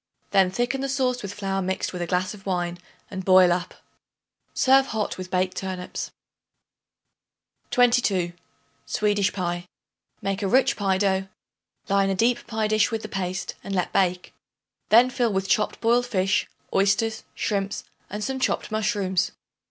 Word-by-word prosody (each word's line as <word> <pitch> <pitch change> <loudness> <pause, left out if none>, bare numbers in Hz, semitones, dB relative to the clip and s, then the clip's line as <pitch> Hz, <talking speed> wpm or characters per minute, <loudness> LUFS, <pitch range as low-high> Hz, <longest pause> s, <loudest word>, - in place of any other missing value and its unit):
Then 190 -2 +4
thicken 245 +7 -1
the 275 - -2
sauce 255 -2 0
with 200 -1 -6
flour 195 -1 -2
mixed 190 0 -2
with 180 - -4
a 175 - -2
glass 185 +2 0
of 200 -2 -13
wine 175 -2 -1 0.3
and 190 -1 -4
boil 185 -1 +6
up. 175 0 -4 0.8
Serve 270 +1 +4
hot 220 -2 -2
with 185 0 -7
baked 185 0 0
turnips. 185 -1 -4 1.6
22. 225 -8 +3 0.5
Swedish 205 -1 +1
Pie. 175 -2 -3 0.5
Make 195 0 -2
a 200 - 0
rich 260 +6 +3
pie 195 -2 +1
dough; 190 -1 +1 0.6
line 195 0 +2
a 195 - +1
deep 235 +5 +1
pie 220 -1 -1
dish 215 +1 +3
with 225 -2 -3
the 215 - -6
paste 185 -2 -3
and 195 - -4
let 180 - -1
bake. 180 -1 +1 0.6
Then 240 +4 +6
fill 240 -2 +1
with 195 0 -1
chopped 210 +2 +1
boiled 240 +2 +3
fish, 190 -4 +1 0.3
oysters, 200 +3 +2
shrimps 200 -1 -2 0.3
and 210 +1 -4
some 265 +2 -2
chopped 255 - -1
mushrooms. 205 -4 0
195 Hz, 155 wpm, -25 LUFS, 185-220 Hz, 1.6 s, boil